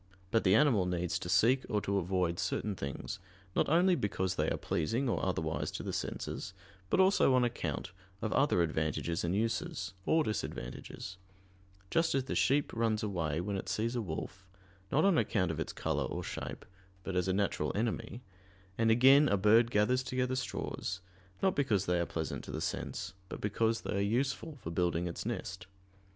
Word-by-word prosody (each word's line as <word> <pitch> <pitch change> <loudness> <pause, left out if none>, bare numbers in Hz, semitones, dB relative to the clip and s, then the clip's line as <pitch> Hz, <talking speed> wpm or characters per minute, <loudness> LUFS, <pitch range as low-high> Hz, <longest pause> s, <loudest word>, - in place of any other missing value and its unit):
But 115 - +3
the 95 +1 +5
animal 115 -10 +4
needs 90 -1 -1
to 90 - -6
seek 120 +9 +4
or 105 -3 +1
to 100 0 0
avoid 90 -2 0
certain 105 -2 -1
things, 70 -5 -5 0.4
not - - +2
only 175 +4 +5
because 95 - 0
they - - 0
are - - -1
pleasing 115 - -1
or 120 - 0
otherwise 80 -4 -1
to - - -4
the - - -4
senses, 95 - -4 0.3
but - - +2
also 190 -8 +5
on 125 - +4
account 120 -6 -2 0.3
of 110 +1 -2
other 135 -11 +3
advantages 80 +1 -1
and 85 +2 0
uses, 105 -3 -1
or 160 0 +4
disadvantages: 100 -3 -5 0.7
just 165 -3 +2
as 135 - +2
the 130 - -4
sheep 140 +2 +2
runs 115 -1 +1
away 85 -6 -1
when 100 +2 -2
it 95 -1 -4
sees 115 +6 -1
a 120 - 0
wolf, 95 +1 -6 0.4
not 155 +5 +3
on 195 -5 +5
account 90 -5 +1
of 80 - -4
its - - -2
color - - -1
or - - -4
shape, - - -6 0.4
but 95 - -4
as 90 0 +1
a - - +2
natural 100 +1 0
enemy: 115 +2 -2 0.6
and 115 0 +4
again 135 +5 +7
a 100 - +3
bird 110 +4 +5
gathers 120 +4 +3
together 130 0 -1
straws, 95 -6 -3 0.4
not 190 -1 +3
because 105 -9 +1
they 90 -1 +1
are 85 - 0
pleasant 80 -1 -3
to - - -10
the - - -3
sense, - - -3 0.2
but - - -6
because 110 +2 0
they - - -3
are - - +1
useful 130 +9 0
for 80 - -4
building 85 0 +1
its 85 - -4
nest. - - -4
105 Hz, 185 wpm, -32 LUFS, 90-125 Hz, 0.7 s, again